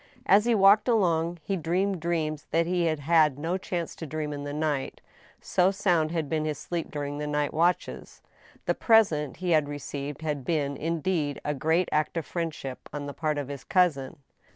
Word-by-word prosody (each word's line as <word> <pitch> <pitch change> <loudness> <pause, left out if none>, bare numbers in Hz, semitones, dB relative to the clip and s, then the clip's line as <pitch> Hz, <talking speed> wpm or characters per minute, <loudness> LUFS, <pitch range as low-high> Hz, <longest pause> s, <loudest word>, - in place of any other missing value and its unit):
As 205 +3 +5
he 240 -1 +3
walked 200 +2 +6
along 175 -7 +2
he 195 - -1
dreamed 185 +3 0
dreams 155 -3 -2
that 165 0 +2
he 175 0 0
had 155 -2 0
had 155 -2 +3
no 165 +5 -2
chance 175 -3 -4
to 160 - -6
dream 150 0 -3
in 145 0 -6
the 145 - -4
night, 150 -2 -2 0.4
so 180 +1 +2
sound 175 -5 +1
had 160 -2 -2
been 155 +1 -1
his 155 -2 -2
sleep 170 +3 -4
during 145 0 -4
the 150 - -3
night 150 0 -1
watches. 175 +3 -1 0.4
The - - +2
present 170 - +3
he 180 0 -2
had 155 -3 +3
received 145 +1 -6
had 150 -3 -2
been, 145 -2 -1
indeed, 160 -2 -1
a 150 - 0
great 160 +5 +1
act 155 +2 0
of 165 - -2
friendship 160 -6 -5
on 145 -1 -5
the 145 - -6
part 155 -1 -1
of 145 -2 -3
his 140 -1 -7
cousin. 160 -8 +1
160 Hz, 195 wpm, -27 LUFS, 145-175 Hz, 0.4 s, walked